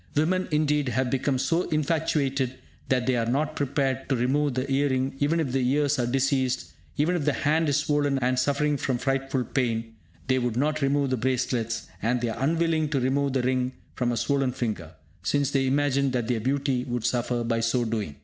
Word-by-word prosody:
Women, 180 +5 +1
indeed, 150 -2 +1
have 125 +1 0
become 135 0 +1
so 165 +7 0
infatuated 145 -4 0 0.3
that 125 -2 +2
they 130 0 +2
are 115 -1 0
not 150 +5 0
prepared 135 -1 -1
to 135 - +2
remove 135 +3 +1
the 130 +1 -1
ear 140 +1 +2
ring 130 0 0
even 150 +4 +2
if 145 -6 -1
the 135 0 +1
ears 145 0 +2
are 120 - +1
diseased; 130 0 0 0.3
even 160 +5 +2
if 170 - -1
the 145 - +2
hand 155 +4 +1
is 140 - +2
swollen 145 -2 +1
and 125 0 +1
suffering 145 +2 +1
from 130 -1 -1
frightful 135 0 -1
pain, 115 -3 -1 0.3
they 130 0 +2
would 120 -2 -1
not 150 +3 0
remove 140 0 +1
the 130 - +1
bracelets; 115 -2 -1 0.2
and 120 +3 +1
they 120 -1 -1
are 115 +3 -4
unwilling 160 0 +1
to 145 -2 0
remove 135 +2 +1
the 130 -2 +1
ring 130 0 0 0.2
from 120 -1 0
a 120 - -1
swollen 135 -1 +1
finger, 110 -10 -4 0.3
since 140 +8 0
they 135 -1 +1
imagine 140 0 +2
that 125 -3 -1
their 120 -2 0
beauty 135 +1 0
would 120 -3 -3
suffer 120 0 0
by 115 0 0
so 115 +2 +1
doing! 110 -9 -3
135 Hz, 205 wpm, -26 LUFS, 125-145 Hz, 0.3 s, that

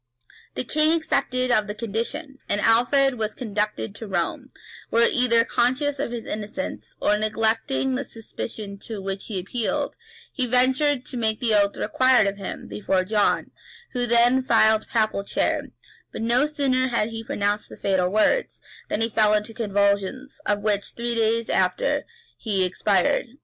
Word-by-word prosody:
The - - -2
king 310 +5 +2
accepted 255 -5 0
of 215 -3 +2
the 210 - -5
condition, 240 +7 -4
and 205 - +1
Alfred 245 +3 +3
was 215 -1 -2
conducted 210 -2 -3
to 220 +2 -8
Rome, 195 - -2 0.4
where, 235 +1 +4
either 235 -2 +3
conscious 270 +4 0
of - - -1
his 235 -2 -5
innocence, 215 +6 -5
or 210 0 +2
neglecting 225 +5 0
the 265 +2 -1
superstition 215 -3 -8
to 220 0 -7
which 195 0 -5
he 210 - -4
appealed, 220 +5 -2 0.4
he 255 -3 0
ventured 255 +2 +3
to 250 - -5
make 220 -2 0
the 235 -4 +2
oath 205 -1 +2
required 255 +1 +3
of 200 0 -2
him, 195 - -7
before 190 -2 -1
John, 210 +2 +1 0.4
who 245 -1 -1
then 240 +2 +4
filled 220 -3 +4
the - - -15
papal 215 -3 +1
chair; - - -1 0.5
but - - -5
no 245 +5 +3
sooner 270 -4 +1
had 235 -3 0
he 225 0 -6
pronounced 210 -5 -2
the - - -11
fatal 190 -2 +1
words, 215 - +1 0.3
than 215 - -1
he 225 - +3
fell 215 -1 +3
into 210 +1 -2
convulsions, 205 +5 -1
of 205 -1 +1
which, 205 -2 0
three 235 0 -2
days 230 0 +1
after, - - +1 0.3
he 200 -5 0
expired. 185 +3 +1
225 Hz, 165 wpm, -24 LUFS, 210-255 Hz, 0.5 s, where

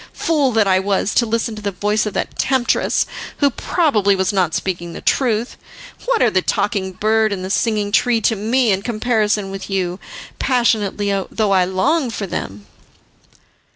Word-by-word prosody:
Fool 295 -5 +1
that 220 -2 +3
I 185 -1 +3
was 195 +1 0
to 235 - +2
listen 225 0 -1
to 215 - -8
the 205 - -2
voice 210 +3 -1
of 210 - -5
that - - -3
temptress, 260 -3 +1 0.3
who 285 -1 +3
probably 225 - +1
was 190 +1 0
not 180 -5 +1
speaking 175 -2 -3
the - - -7
truth. 235 -3 0 0.5
What - - +2
are 235 - +3
the 185 - +2
Talking 190 0 -1
Bird 220 +2 +1
and 185 -2 -3
the 190 - -4
Singing 210 -2 0
Tree 240 +2 +3
to 225 - +2
me 225 +3 +1
in 190 0 0
comparison 215 -3 0
with 195 0 -7
you, 185 -1 -2 0.4
passionately 215 -5 +1 0.2
though 215 -2 0
I 185 -2 +4
long 255 - 0
for 215 -3 -4
them!" 100 - -6
210 Hz, 175 wpm, -19 LUFS, 195-235 Hz, 0.5 s, I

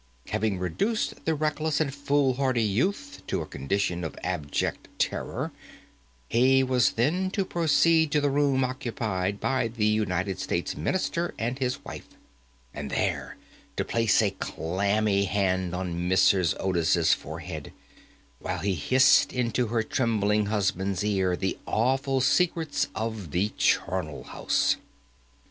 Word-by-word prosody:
Having 105 -2 0
reduced 195 - -2
the 160 - +1
reckless 155 0 0
and 145 -4 0
foolhardy 135 -3 +1
youth 195 - -1
to - - -1
a - - -8
condition 90 +4 -2
of 80 - -5
abject 85 -6 -2
terror, - - -2 0.8
he 130 +3 +4
was 125 -6 +2
then 170 +11 +1
to 195 0 -1
proceed 165 -2 +3
to 150 - +3
the 145 -1 +1
room 140 -2 +2
occupied 110 -7 -2
by 130 -3 0
the 115 -2 -2
United 95 -4 0
States - - -2
Minister 170 - -1
and 120 +4 -2
his 125 -1 -2
wife, - - -8 0.7
and - - -5
there - - -2 0.4
to - - 0
place 115 -2 +2
a 100 - +1
clammy 100 +3 0
hand 95 -2 0
on 90 -1 -3
Mrs. 95 -1 +4
Otis's 85 -3 +2
forehead, - - -6 0.7
while 90 - -3
he 95 +3 -1
hissed 130 - +4
into 125 -1 0
her 115 0 0
trembling 105 -4 +1
husband's 100 -2 0
ear 95 -3 +1
the 95 +1 -2
awful 130 +3 +1
secrets 165 0 +1
of 110 -5 -4
the 95 +7 0
charnel 90 -7 0
house. - - 0
110 Hz, 130 wpm, -27 LUFS, 95-135 Hz, 0.8 s, he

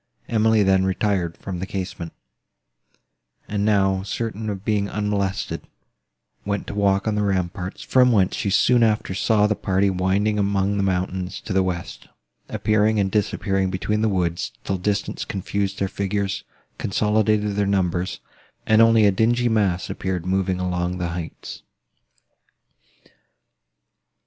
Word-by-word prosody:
Emily 110 -1 +3
then 95 -1 +3
retired 95 -3 0
from 95 -3 -6
the 95 - -4
casement, 90 -4 -5 1.4
and, 105 -1 -1
now 95 -2 +2
certain 110 +2 -4
of 100 0 -5
being 105 -2 0
unmolested, 100 -2 -2 0.8
went 100 -1 -2
to - - -6
walk 100 0 +1
on 110 - +1
the 105 - 0
ramparts, 95 -1 -2
from 125 -1 +4
whence 95 -5 +2
she 100 - -1
soon 120 +5 +4
after 110 -4 +1
saw 105 +2 +2
the 105 - +2
party 100 -1 +1
winding 100 +3 +1
among 100 0 +1
the - - +1
mountains 95 -1 -2
to 105 - -5
the 95 - +3
west, 90 -2 -4 0.4
appearing 110 0 +2
and 95 -1 +1
disappearing 95 -2 0
between 105 +3 -1
the 110 - +2
woods, 85 -3 -1
till 95 -1 -2
distance 100 +2 -1
confused 100 0 -3
their 100 - 0
figures, 100 +1 -2 0.3
consolidated 105 0 +1
their 100 -1 +1
numbers, 90 -2 0 0.4
and 110 +1 +5
only 115 -1 +6
a 100 - +5
dingy 120 +5 +2
mass 95 -6 +1
appeared 90 -2 -3
moving 95 0 0
along 90 0 -1
the 90 -1 -2
heights. 85 -1 -7
100 Hz, 140 wpm, -23 LUFS, 95-105 Hz, 1.4 s, only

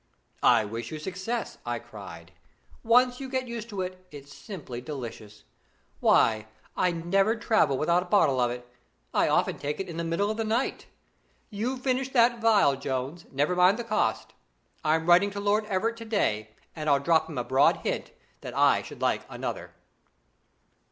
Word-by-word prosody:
'I 115 -3 +5
wish 115 +2 -5
you 155 - -5
success!' 190 +8 -4
I 120 0 -2
cried. 100 -8 -11 0.5
'Once 250 +2 +4
you 270 -1 -6
get 260 -1 -2
used 235 -1 -6
to 200 -3 -4
it, 185 0 -6
it's 145 -1 -12
simply 150 - -8
delicious. 115 -6 -8 0.6
Why, 110 -1 +3 0.3
I'd 170 -2 0
never 195 +5 +3
travel 215 - +2
without 170 +5 +2
a 180 - -8
bottle 155 -10 +3
of 120 -1 +2
it. 120 0 -7 0.5
I - - +3
often - - +1
take 145 +1 -3
it 195 - -3
in 170 -2 -7
the 170 - -2
middle 170 +6 0
of 215 - -5
the 225 - 0
night. 225 +4 -1 0.6
You 230 +6 -2
finish 255 0 -1
that 235 -1 +4
phial, 210 -11 +4
Jones; 135 +4 -4
never 145 +6 0
mind 180 +4 +5
the 240 - -4
cost. 215 -2 -1 0.5
I'm 160 +1 +1
writing 175 +4 +5
to 200 0 -6
Lord 205 +1 +1
Everett 220 +3 -1
to 230 - -8
day, 110 - 0 0.3
and 155 -2 -2
I'll 140 -1 +4
drop 160 +3 +2
him 155 - -7
a 125 - 0
broad 130 +4 +3
hint - - -2 0.3
that - - -8
I - - +4
should - - -11
like - - +1
another.' - - -5
175 Hz, 180 wpm, -27 LUFS, 135-220 Hz, 0.6 s, I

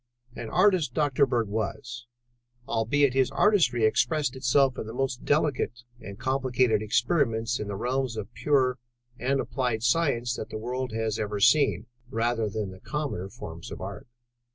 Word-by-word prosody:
An 115 - -6
artist 180 - +3
Dr. 145 -2 +3
Bird 120 -3 0
was, 120 +3 -4 0.6
albeit 125 +4 +2
his 130 -1 +3
artistry 165 - +3
expressed 125 +5 +1
itself 130 0 +2
in - - -5
the 110 - -7
most 130 -2 -2
delicate 145 -5 0 0.2
and 100 +1 -9
complicated 130 -4 +1
experiments 115 - +1
in 105 - -4
the 100 - -4
realms 125 +2 -1
of 110 +2 -6
pure 130 -4 +1 0.4
and 135 +3 +1
applied 120 -2 -1
science 120 -3 +1
that - - -6
the - - -5
world 125 +3 -3
has 110 -1 -2
ever 105 -1 -2
seen, 105 - +4 0.2
rather 115 -2 0
than 110 +1 -3
in 95 - -6
the 95 - -12
commoner 140 -9 -4
forms 80 -3 -9
of - - -7
art. 100 +8 -7
120 Hz, 160 wpm, -27 LUFS, 110-135 Hz, 0.6 s, seen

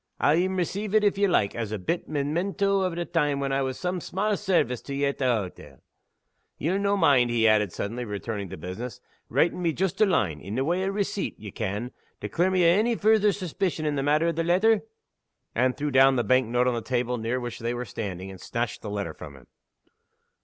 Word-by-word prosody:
I'll 150 - +4
een 185 +2 +1
receive 195 +4 -2
it, 215 - +5
if 205 -1 +2
ye 200 - +4
like, 105 - +2
as 115 -3 -4
a 110 - -2
bit 135 - -3
Memento 190 +7 0
o' 185 - +1
the 170 0 -3
time 150 -5 0
when 135 -1 -1
I 135 0 +1
was 130 -1 -2
o' - - -14
some 180 -1 -2
sma' 205 +5 -1
sairvice 175 - 0
to 140 - -4
ye 140 +1 +1
at 140 - -2
the 135 - 0
hottle. 105 -7 -3 0.8
Ye'll 180 +6 0
no' 200 0 +1
mind," 140 -9 +4
he 115 -1 +3
added, 105 -3 +3
suddenly 115 +7 -4
returning 105 -2 -4
to 95 - -7
business, 95 +8 -6 0.3
"writin' 175 +2 +1
me 165 -2 +1
joost 190 +4 -1
a 215 - +6
line 90 - 0
in 100 +4 -6
the 135 +2 0
way 175 +4 0
o' - - -1
receipt, 200 0 -2
ye 105 -2 -8
ken 105 +8 -3 0.3
to 105 - -4
clear 175 - +1
me 185 -2 +3
o' 170 +4 +5
ony 235 +2 +2
future 215 -1 +4
suspicion 180 -3 -2
in 150 - +1
the 140 - -1
matter 150 +4 +2
o' - - +2
the 165 0 -1
letter?" 190 +7 +3 0.7
Anne 130 0 +2
threw 145 +2 -3
down 135 0 +6
the 120 - +1
bank 130 +2 +3
note 125 +2 +1
on 125 - +2
the 120 - -2
table 125 +1 -1
near 115 +3 -1
which 120 -2 -6
they 120 +1 -2
were 125 +1 -4
standing, 95 -5 -5
and 95 -2 -11
snatched 120 -1 -3
the 105 - -6
letter 100 -5 -3
from 70 -2 -10
him. 65 - -16
140 Hz, 235 wpm, -26 LUFS, 115-185 Hz, 0.8 s, a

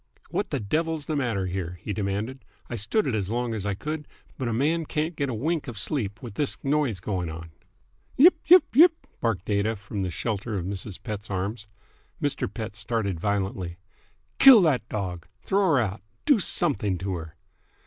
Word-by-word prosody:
"What - - -1
the - - -1
devil's 155 +7 -1
the 155 - -2
matter 115 -9 0
here?" 90 -1 -4
he 105 - -4
demanded. 105 +6 -3 0.3
"I - - -2
stood 115 - +1
it 130 - 0
as 100 -3 -1
long 120 +1 -1
as 105 -2 -3
I 100 - 0
could, 150 +6 -5 0.3
but 130 - -3
a - - 0
man 150 +7 +1
can't 155 +3 -1
get 140 -2 -1
a - - -2
wink 155 +5 -1
of 120 -4 -6
sleep 110 -2 -2
with 115 -4 -7
this 145 +5 0
noise 140 -8 +1
going 90 -2 -2
on!" 80 +1 -8 0.7
"Yipe! 340 +7 +8
Yipe! 360 +2 +7
Yipe!" 330 +3 +6
barked 110 -5 -1
Aida 105 +2 +1
from 100 0 -5
the 95 - -1
shelter 105 +3 -3
of 90 - -3
Mrs. 100 0 -5
Pett's 105 -2 -5
arms. 100 +3 -3 0.5
Mr. 145 - -1
Pett 110 -3 -6
started 105 -4 -2
violently. 95 -3 -2 0.6
"Kill 260 -7 +10
that 130 -8 +1
dog! 90 -5 -4 0.2
Throw 200 +1 +2
her - - +4
out! 105 -3 -2 0.2
Do 285 -7 +5
something 135 - +1
to 95 +1 -3
her!" 80 -3 -6
110 Hz, 190 wpm, -26 LUFS, 100-145 Hz, 0.7 s, Kill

